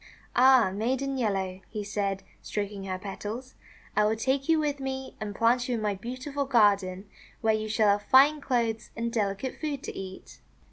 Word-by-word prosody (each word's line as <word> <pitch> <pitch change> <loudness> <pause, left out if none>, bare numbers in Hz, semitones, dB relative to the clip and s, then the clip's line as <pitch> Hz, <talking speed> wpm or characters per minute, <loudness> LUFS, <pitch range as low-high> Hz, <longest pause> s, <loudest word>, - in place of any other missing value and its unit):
"Ah, 255 -5 +6
Maiden 260 +6 -1
Yellow," 195 -6 -1
he 210 -2 -4
said, 200 -1 -2 0.2
stroking 205 -1 -4
her 185 -1 -3
petals, 210 +6 -6 0.4
<f*I 210 - +4
will 215 +1 +2
take 265 +6 -1
you 325 - +5
with 295 -2 0
me, 265 0 -5
and 205 -1 -5
plant 240 +3 +2
you 245 - +1
in 225 - -3
my 210 -1 +1
beautiful 255 +7 -4
garden, 200 -6 +3 0.4
where 220 -1 +3
you 215 0 -2
shall 215 -1 +3
have 200 0 +3
fine 285 +3 +6
clothes 230 -5 -1
and 230 0 -3
delicate 210 +2 -2
food 290 -3 -3
to - - -6
eat." 190 -1 -9
225 Hz, 180 wpm, -28 LUFS, 205-265 Hz, 0.4 s, Ah